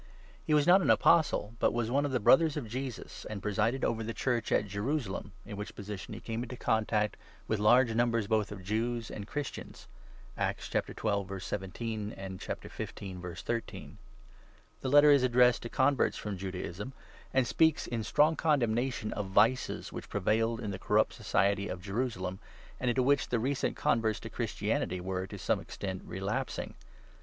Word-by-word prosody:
He 155 Hz, -, +2 dB
was 150 Hz, -1 st, +4 dB
not 180 Hz, +3 st, +7 dB
an -, -, +1 dB
Apostle, 155 Hz, -10 st, +4 dB
but -, -, +3 dB
was 120 Hz, -1 st, -1 dB
one 140 Hz, +2 st, +2 dB
of -, -, -4 dB
the 130 Hz, -, +1 dB
brothers 150 Hz, +8 st, +5 dB
of 130 Hz, -6 st, -4 dB
Jesus, 130 Hz, +1 st, -6 dB
and 105 Hz, -2 st, -5 dB
presided 110 Hz, +6 st, 0 dB
over 115 Hz, -1 st, 0 dB
the 115 Hz, 0 st, -4 dB
Church 120 Hz, 0 st, -1 dB
at -, -, +3 dB
Jerusalem, 100 Hz, 0 st, -3 dB
in 105 Hz, -1 st, -7 dB
which 105 Hz, +2 st, -6 dB
position 105 Hz, 0 st, -6 dB
he -, -, -7 dB
came 115 Hz, 0 st, -4 dB
into 125 Hz, +1 st, -6 dB
contact 110 Hz, -2 st, +1 dB, 0.3 s
with 110 Hz, -, 0 dB
large 120 Hz, +3 st, +5 dB
numbers 115 Hz, -1 st, +2 dB
both 105 Hz, 0 st, +1 dB
of 100 Hz, -2 st, -7 dB
Jews 115 Hz, +3 st, -1 dB
and 100 Hz, -1 st, -6 dB
Christians 145 Hz, +2 st, -6 dB, 0.5 s
(Acts -, -, -2 dB
12. 100 Hz, -3 st, -2 dB
17; 105 Hz, +2 st, -4 dB, 0.2 s
15. 95 Hz, -2 st, -6 dB
13). 95 Hz, -1 st, -5 dB, 0.8 s
The 130 Hz, -, -2 dB
Letter 145 Hz, +2 st, +7 dB
is 140 Hz, -2 st, +6 dB
addressed 125 Hz, -1 st, +4 dB
to 115 Hz, -, -6 dB
converts 135 Hz, +2 st, +2 dB
from 105 Hz, -2 st, -4 dB
Judaism, 95 Hz, +5 st, -5 dB, 0.4 s
and 130 Hz, -1 st, +3 dB
speaks, 160 Hz, +4 st, +3 dB
in 115 Hz, -2 st, -3 dB
strong 150 Hz, +8 st, +3 dB
condemnation, 120 Hz, -6 st, +1 dB
of 105 Hz, -2 st, -3 dB
vices 110 Hz, +7 st, +2 dB
which -, -, -7 dB
prevailed 115 Hz, +3 st, +1 dB
in 105 Hz, -3 st, -3 dB
the 95 Hz, -, -5 dB
corrupt -, -, +2 dB
society 100 Hz, 0 st, +1 dB
of 90 Hz, -, -5 dB
Jerusalem, 95 Hz, -2 st, -3 dB, 0.4 s
and 125 Hz, -, 0 dB
into 130 Hz, +1 st, +2 dB
which 140 Hz, +2 st, +3 dB
the 120 Hz, -, +1 dB
recent 130 Hz, +4 st, -1 dB
converts 115 Hz, -7 st, +1 dB
to -, -, -8 dB
Christianity 90 Hz, +1 st, -1 dB
were, 95 Hz, +1 st, -3 dB
to 100 Hz, -, -8 dB
some 90 Hz, -, 0 dB
extent, 95 Hz, -2 st, -5 dB
relapsing. 95 Hz, +3 st, -3 dB
110 Hz, 165 wpm, -31 LUFS, 100-130 Hz, 0.8 s, not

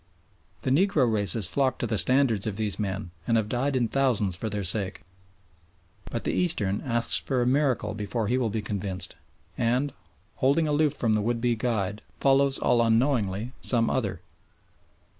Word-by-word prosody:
The 130 Hz, -, 0 dB
negro 160 Hz, -2 st, +3 dB
races 105 Hz, 0 st, +1 dB
flock 135 Hz, +4 st, 0 dB
to -, -, -2 dB
the 110 Hz, -3 st, +1 dB
standards 125 Hz, -6 st, +2 dB
of 100 Hz, -2 st, -3 dB
these 110 Hz, -2 st, -2 dB
men 95 Hz, -3 st, -3 dB, 0.2 s
and 115 Hz, -, +3 dB
have 110 Hz, -2 st, 0 dB
died 130 Hz, +5 st, -1 dB
in 120 Hz, -2 st, +1 dB
thousands 115 Hz, -8 st, +1 dB
for 110 Hz, +5 st, -4 dB
their 105 Hz, -1 st, -3 dB
sake, 95 Hz, +1 st, +1 dB, 1.1 s
but -, -, -4 dB
the -, -, -1 dB
Eastern 105 Hz, -, 0 dB
asks 120 Hz, -2 st, +1 dB
for 130 Hz, -2 st, -1 dB
a 120 Hz, -, +1 dB
miracle 130 Hz, -4 st, +1 dB
before 110 Hz, +2 st, -3 dB
he 125 Hz, +4 st, +1 dB
will 120 Hz, -3 st, 0 dB
be 105 Hz, 0 st, -3 dB
convinced, 100 Hz, -2 st, -2 dB, 0.4 s
and, 125 Hz, +4 st, +1 dB, 0.4 s
holding 145 Hz, +5 st, +2 dB
aloof 150 Hz, 0 st, +2 dB
from 115 Hz, -5 st, 0 dB
the 105 Hz, -, +1 dB
would 115 Hz, +2 st, -1 dB
be 120 Hz, 0 st, +1 dB
guide, 110 Hz, -3 st, -2 dB, 0.2 s
follows 135 Hz, 0 st, +3 dB
all 120 Hz, -, +2 dB
unknowingly 115 Hz, -2 st, +1 dB
some 115 Hz, -2 st, +1 dB
other. 100 Hz, -9 st, -2 dB
115 Hz, 170 wpm, -26 LUFS, 105-130 Hz, 1.1 s, negro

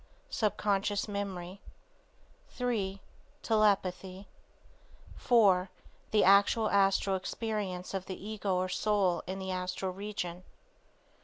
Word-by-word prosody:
Subconscious 205 Hz, -1 st, 0 dB
memory. 195 Hz, -2 st, -5 dB, 0.9 s
3. 210 Hz, -6 st, -2 dB, 0.4 s
Telepathy. 195 Hz, -3 st, +1 dB, 0.9 s
4. 195 Hz, -6 st, +4 dB, 0.4 s
The 215 Hz, -, +3 dB
Actual 200 Hz, +3 st, +5 dB
Astral 195 Hz, 0 st, +3 dB
experience 190 Hz, -2 st, -4 dB
of 190 Hz, -1 st, -4 dB
the 190 Hz, -, -5 dB
Ego 205 Hz, -3 st, -2 dB
or 185 Hz, 0 st, 0 dB
Soul 195 Hz, -2 st, +1 dB
in 190 Hz, +1 st, -4 dB
the 190 Hz, -1 st, -4 dB
Astral 185 Hz, 0 st, -3 dB
region. 185 Hz, -3 st, -5 dB
195 Hz, 95 wpm, -31 LUFS, 185-210 Hz, 0.9 s, Actual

